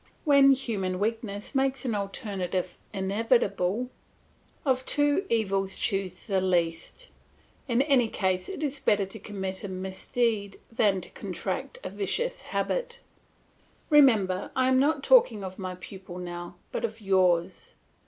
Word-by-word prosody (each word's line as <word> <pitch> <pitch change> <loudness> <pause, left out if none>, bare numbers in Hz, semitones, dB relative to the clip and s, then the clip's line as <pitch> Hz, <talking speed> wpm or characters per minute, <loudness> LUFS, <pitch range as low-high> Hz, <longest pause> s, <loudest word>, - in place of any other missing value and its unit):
When 280 -2 +7
human 205 -8 -1
weakness 210 +1 -3
makes 270 -1 0
an 240 - 0
alternative 195 -3 -3 0.2
inevitable, 205 +2 +1 0.7
of 260 -2 +2
two 290 +6 +2
evils 195 -4 0
choose 195 -3 -1
the 195 -3 +1
least; 175 - -1 0.6
in 245 +1 +3
any 270 -5 +3
case 185 -3 -1
it 310 - -5
is 290 -1 -2
better 205 -5 +2
to 195 +3 -10
commit 190 -2 -5
a - - -3
misdeed 195 +3 -2
than 205 -4 +2
to - - -9
contract 255 +8 -4
a 185 - -5
vicious 345 - -1
habit. - - -2 0.9
Remember, 215 -11 +5
I 260 0 +3
am 260 0 +4
not 285 0 +2
talking 265 - +5
of 190 +1 -7
my 185 -1 -4
pupil 185 -1 -9
now, 175 0 -6 0.2
but - - -3
of 225 -1 -3
yours. 190 - +1
205 Hz, 135 wpm, -27 LUFS, 190-260 Hz, 0.9 s, When